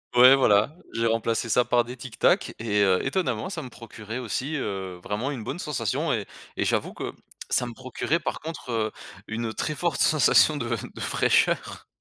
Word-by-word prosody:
ouais, 125 Hz, +2 st, +9 dB
voilà. 110 Hz, +1 st, +3 dB, 0.2 s
J'ai 115 Hz, 0 st, 0 dB
remplacé 115 Hz, +1 st, 0 dB
ça 120 Hz, +3 st, +3 dB
par 120 Hz, -1 st, +3 dB
des 120 Hz, +2 st, -8 dB
Tic 125 Hz, -1 st, -10 dB
Tac -, -, +2 dB
et 105 Hz, -2 st, 0 dB
heu, 95 Hz, -2 st, +4 dB
étonnamment, 135 Hz, -, -1 dB
ça -, -, -4 dB
me 130 Hz, -, -8 dB
procurait 115 Hz, -1 st, -8 dB
aussi, 130 Hz, +5 st, -3 dB
heu, 95 Hz, -9 st, -4 dB
vraiment 105 Hz, +7 st, -2 dB
une 125 Hz, -6 st, -5 dB
bonne 145 Hz, -, -5 dB
sensation 120 Hz, -, -1 dB
et -, -, -2 dB, 0.3 s
et -, -, 0 dB
j'avoue -, -, 0 dB
que -, -, -5 dB, 0.4 s
ça -, -, +2 dB
me 120 Hz, -, -7 dB
procurait, 130 Hz, +6 st, -2 dB
par 165 Hz, -, -3 dB
contre, 160 Hz, -5 st, -7 dB
heu, 110 Hz, -2 st, 0 dB, 0.4 s
une 110 Hz, 0 st, -3 dB
très 150 Hz, -, -2 dB
forte 170 Hz, -3 st, -1 dB
sensation 155 Hz, 0 st, +5 dB
de 120 Hz, -, -3 dB, 0.3 s
de -, -, -9 dB
fraîcheur -, -, +1 dB
120 Hz, 190 wpm, -26 LUFS, 110-135 Hz, 0.4 s, ouais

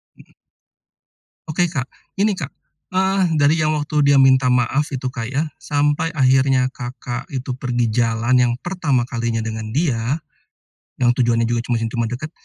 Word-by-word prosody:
Mmm. -, -, -21 dB, 1.1 s
Oke 175 Hz, +3 st, +1 dB
Kak, 135 Hz, -5 st, -2 dB, 0.3 s
ini 205 Hz, +1 st, +2 dB
Kak, 155 Hz, -6 st, -5 dB, 0.4 s
eee, 185 Hz, -3 st, +1 dB
dari 150 Hz, +3 st, +3 dB
yang 155 Hz, 0 st, +1 dB
waktu 150 Hz, 0 st, 0 dB
dia 140 Hz, 0 st, +5 dB
minta 130 Hz, -1 st, +5 dB
maaf 135 Hz, +4 st, +1 dB
itu 130 Hz, -1 st, -3 dB
Kak 115 Hz, -4 st, -4 dB
ya, 140 Hz, +4 st, 0 dB, 0.2 s
sampai 145 Hz, +2 st, 0 dB
akhirnya 130 Hz, -2 st, +3 dB
Kakak 125 Hz, +3 st, -6 dB
itu 130 Hz, -3 st, -4 dB
pergi 125 Hz, -2 st, -1 dB
jalan 115 Hz, +1 st, +1 dB
yang 120 Hz, -1 st, +2 dB
pertama 160 Hz, -9 st, 0 dB
kalinya 115 Hz, -2 st, -2 dB
dengan 110 Hz, -1 st, -4 dB
dia, 130 Hz, -1 st, 0 dB, 0.8 s
yang 120 Hz, -1 st, +3 dB
tujuannya 115 Hz, -2 st, +2 dB
juga 120 Hz, 0 st, 0 dB, 0.2 s
yang 115 Hz, -, -2 dB
cuma 115 Hz, 0 st, -2 dB
dekat, 145 Hz, +5 st, -5 dB
130 Hz, 155 wpm, -20 LUFS, 120-150 Hz, 1.1 s, dia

